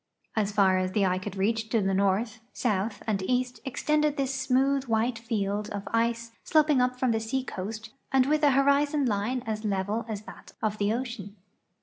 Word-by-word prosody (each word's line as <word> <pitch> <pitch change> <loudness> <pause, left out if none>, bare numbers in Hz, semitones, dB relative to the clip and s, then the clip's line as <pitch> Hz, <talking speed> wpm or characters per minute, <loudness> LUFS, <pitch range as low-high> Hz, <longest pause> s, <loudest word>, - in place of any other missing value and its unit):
As 210 -2 0
tar 190 -2 +4
as 185 0 -2
the 205 -2 +2
eye 185 0 +1
could 195 +1 -6
reach 220 +3 0
to 225 - +2
the 195 -1 +1
north, 200 +4 +1
south, 210 -2 -1
and 210 -3 0
east 250 0 0
extended 300 +2 0
this 270 -1 0
smooth, 265 +1 +1
white 225 0 0
field 210 -2 -2
of 200 -2 -5
ice 230 0 0
sloping 300 -4 +3
up 250 0 +1
from 255 -1 +1
the 225 - +1
seacoast 220 -3 -4 0.2
and 265 -1 +4
with 300 +2 +1
an 285 -2 +5
horizon 280 +1 +3
line 235 +3 -1
as 215 -1 -3
level 205 +2 -1
as 210 -1 -4
that - - -13
of 215 -1 -2
the 205 0 +2
ocean. 230 -4 -4
225 Hz, 190 wpm, -27 LUFS, 205-260 Hz, 0.2 s, an